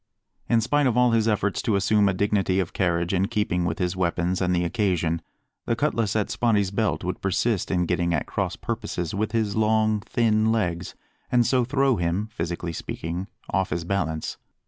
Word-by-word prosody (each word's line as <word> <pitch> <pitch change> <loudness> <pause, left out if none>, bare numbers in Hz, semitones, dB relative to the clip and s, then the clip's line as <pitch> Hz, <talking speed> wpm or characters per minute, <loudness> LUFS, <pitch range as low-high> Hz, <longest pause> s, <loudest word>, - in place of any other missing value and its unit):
In 115 -1 +4
spite 145 +4 +2
of 125 -1 +1
all 125 -1 +5
his 115 -1 +2
efforts 105 -2 0
to 110 - +1
assume 100 +1 +3
a - - +1
dignity 100 -1 +1
of 90 -3 -2
carriage 85 -1 0
in 95 +1 +2
keeping 105 -6 0
with 85 -1 -1
his 90 0 -1
weapons 90 0 0
and 90 -1 +1
the 90 - +1
occasion, 85 -3 0 0.5
the 115 - +2
cutlass 115 -7 0
at 105 -2 0
Spottie's 105 -5 +1
belt 105 +1 0
would 90 -1 -3
persist 100 +1 0
in 90 -2 +1
getting 85 0 0
at 75 -4 0
crosspurposes 85 -2 -3
with 110 +1 -1
his 110 -3 0
long, 110 0 +2
thin 110 0 +1
legs, 90 -6 -1 0.4
and 120 -1 +4
so 125 0 +3
throw 135 0 +2
him, 85 +5 -1
physically 85 -2 -4
speaking, 85 +4 -5 0.2
off 95 +1 +1
his 85 +2 -2
balance. 85 -4 -2
100 Hz, 185 wpm, -25 LUFS, 90-110 Hz, 0.5 s, all